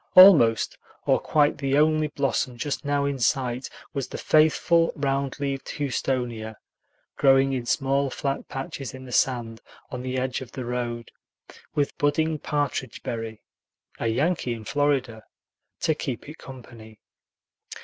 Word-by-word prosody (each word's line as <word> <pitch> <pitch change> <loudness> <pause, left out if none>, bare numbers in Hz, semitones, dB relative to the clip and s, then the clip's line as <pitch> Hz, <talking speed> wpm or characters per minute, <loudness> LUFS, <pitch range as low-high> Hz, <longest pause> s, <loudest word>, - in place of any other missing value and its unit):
Almost 150 - +7 0.3
or - - +3
quite 145 -2 +2
the 135 0 +1
only 155 0 +3
blossom 135 -3 -1
just 145 +4 -3
now 145 -1 0
in 140 -1 -2
sight 125 0 0 0.2
was 135 -2 -2
the - - -7
faithful 165 +2 +3
round 140 -1 -1
leaved 140 -1 -3
houstonia, 125 -5 -2 0.6
growing 135 0 +4
in 125 -2 -3
small 135 +1 +1
flat 135 +1 -3
patches 135 -2 -5
in 130 0 -10
the 125 - -10
sand 120 -3 0 0.3
on 125 - -4
the 130 0 -3
edge 130 0 -2
of 130 - -10
the 130 -3 -5
road, 120 -1 -4 0.6
with 145 -1 0
budding 155 +2 +1
partridge 145 -5 -2
berry 115 -2 -5 0.6
a - - -1
Yankee 130 +2 0
in 110 -1 -10
Florida 140 -5 0 0.6
to 160 - +2
keep 135 -5 -5
it 155 +2 -10
company. 115 -4 -12
135 Hz, 140 wpm, -25 LUFS, 120-145 Hz, 0.6 s, Almost